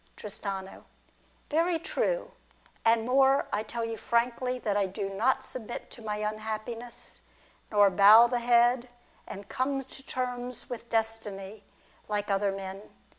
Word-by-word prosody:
Tristano. 195 -2 -6 0.7
Very 335 +3 +2
true. - - -1 0.5
And 225 0 +4
more, 270 +2 +4
I 205 - +1
tell 230 +2 -3
you 225 0 -4
frankly 240 +3 0
that 215 -5 -1
I 200 -1 +2
do 195 +1 -4
not 225 +7 +1
submit 240 -2 -6
to 240 - -11
my 210 -1 -3
unhappiness, 215 +2 -5 0.5
nor 205 -2 +5
bow 210 +5 +8
the 240 0 0
head, 240 +1 +3 0.4
and 200 0 -8
come 270 +3 -1
to 265 +1 -12
terms 250 -2 -4
with 235 -1 -6
Destiny, 220 -3 -3 0.4
like 210 -1 -1
other 195 0 +2
men. 195 0 -6
225 Hz, 135 wpm, -29 LUFS, 205-245 Hz, 0.7 s, bow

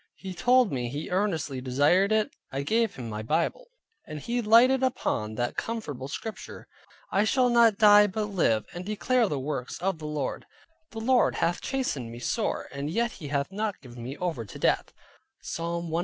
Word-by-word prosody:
He 190 -1 -7
told 250 +2 +3
me 125 -3 -2
he 150 +8 -5
earnestly 165 -9 -1
desired 145 +10 +3
it, 215 -1 +2 0.2
I 135 +1 -2
gave 225 +5 +1
him 125 -3 -6
my 110 -1 -4
Bible, 165 - -1 0.4
and 155 -1 -6
he 240 - -2
lighted 240 +4 +5
upon 110 - -1
that 120 +1 -2
comfortable 150 - -4
Scripture 220 +9 -7 0.4
"I 195 - +3
shall 250 +3 +3
not 230 -3 +5
die 210 -1 +7
but 210 +2 -2
live, 165 - +1
and 175 - -6
declare 220 +4 +1
the 145 - -1
works 135 -2 -4
of 185 -2 -1
the 155 - -6
Lord: 150 -3 -3 0.4
the 225 - -7
Lord 255 +2 +3
hath 175 +1 0
chastened 250 - -2
me 120 - -8
sore 210 - -2
yet 170 +12 -1
he 150 - -9
hath 140 +3 -1
not 210 0 -3
given 120 -2 -11
me 130 +5 -6
over 170 -10 -2
to 100 - -10
death" - - +1 0.5
(Psalm 170 0 -4
118. 165 - +1
180 Hz, 185 wpm, -27 LUFS, 140-220 Hz, 0.5 s, die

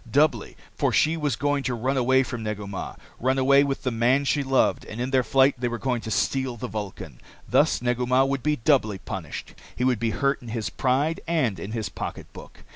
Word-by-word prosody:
Doubly. 140 -3 +1 0.2
For - - +1
she 155 +1 +3
was 150 -6 -1
going 145 +3 0
to 125 - 0
run 130 +4 -1
away 130 +1 +3
from 125 -3 -5
Negu 105 -1 -4
Mah, 100 -1 -6 0.2
run 130 +2 +1
away 140 +1 +5
with 140 -1 -2
the 130 - 0
man 125 +5 +2
she 145 +1 +1
loved, 135 -1 +2
and 110 - -8
in 125 +2 -2
their 130 -1 +4
flight 135 +2 +4
they 125 - 0
were 120 0 -3
going 125 -1 -1
to 110 - -6
steal 130 +2 0
the - - -5
Vulcan. 95 - -7 0.3
Thus - - +2
Negu 125 0 0
Mah 130 +1 +4
would 135 -1 -1
be 150 +2 +1
doubly 115 -6 +2
punished. 95 -4 -7 0.2
He 125 - -2
would 125 -3 +2
be 115 0 0
hurt 140 +5 0
in 120 - -11
his 115 -1 -3
pride 140 +5 0
and 135 - 0
in 100 +6 -6
his 110 -3 -3
pocketbook. - - -8
125 Hz, 220 wpm, -25 LUFS, 115-135 Hz, 0.3 s, away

